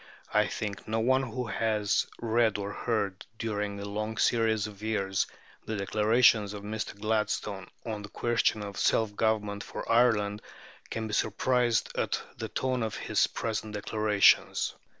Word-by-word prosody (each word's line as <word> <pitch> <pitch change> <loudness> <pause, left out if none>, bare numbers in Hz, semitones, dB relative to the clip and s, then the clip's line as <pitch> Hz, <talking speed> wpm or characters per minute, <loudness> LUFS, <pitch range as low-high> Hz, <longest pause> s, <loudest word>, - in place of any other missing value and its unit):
I - - +4
think 100 -2 -5
no 110 +1 0
one 130 +4 +3
who 125 -1 -3
has 110 -2 +1
read 115 -2 +2
or 100 0 -4
heard, 100 -5 -1
during 105 -2 -2
a 100 - -5
long 105 +2 -3
series 110 -3 +2
of 105 -1 -9
years, 100 -3 0 0.4
the 110 - -2
declarations 105 +1 +3
of 100 -1 -7
Mr. 105 -1 -4
Gladstone 105 -2 -1 0.2
on 110 -3 -4
the 105 - -9
question 115 -2 +1
of 100 -1 -6
self 110 -2 +2
government 105 -2 0
for - - -7
Ireland, 110 -3 +3 0.5
can 115 -1 -3
be 105 - -6
surprised 120 +3 +1
at - - 0 0.2
the 110 - -5
tone 130 +1 -1
of 110 -1 -2
his - - +1
present 110 -1 -3
declarations.... 105 0 +3
110 Hz, 150 wpm, -29 LUFS, 105-115 Hz, 0.5 s, I